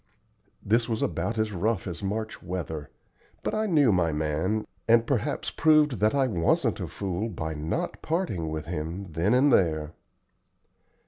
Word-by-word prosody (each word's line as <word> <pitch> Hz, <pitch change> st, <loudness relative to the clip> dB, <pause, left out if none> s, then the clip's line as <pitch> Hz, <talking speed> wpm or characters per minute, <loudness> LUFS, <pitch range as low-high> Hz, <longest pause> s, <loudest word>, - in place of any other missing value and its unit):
'" -, -, -39 dB, 0.2 s
This 120 Hz, -, -5 dB
was 110 Hz, -1 st, -1 dB
about 115 Hz, -, -1 dB
as 110 Hz, -1 st, 0 dB
rough 100 Hz, +3 st, 0 dB
as 90 Hz, -2 st, -5 dB
March 110 Hz, +2 st, -3 dB
weather; 80 Hz, -5 st, -5 dB, 0.5 s
but -, -, -1 dB
I 215 Hz, 0 st, 0 dB
knew 150 Hz, -, +4 dB
my 85 Hz, -4 st, +2 dB
man, 80 Hz, +8 st, -1 dB, 0.2 s
and 115 Hz, 0 st, +5 dB
perhaps 135 Hz, +3 st, -1 dB
proved 150 Hz, -, +4 dB
that 110 Hz, +5 st, +3 dB
I 135 Hz, -1 st, +3 dB
wasn't 85 Hz, -9 st, +1 dB
a -, -, -3 dB
fool 100 Hz, +3 st, -3 dB
by 80 Hz, -6 st, -4 dB
not 75 Hz, +1 st, -3 dB
parting 155 Hz, -, -1 dB
with 80 Hz, -1 st, -4 dB
him 85 Hz, +3 st, -4 dB
then 85 Hz, +9 st, +2 dB
and 135 Hz, +1 st, +5 dB
there. 80 Hz, -3 st, +2 dB
100 Hz, 160 wpm, -27 LUFS, 80-115 Hz, 0.5 s, and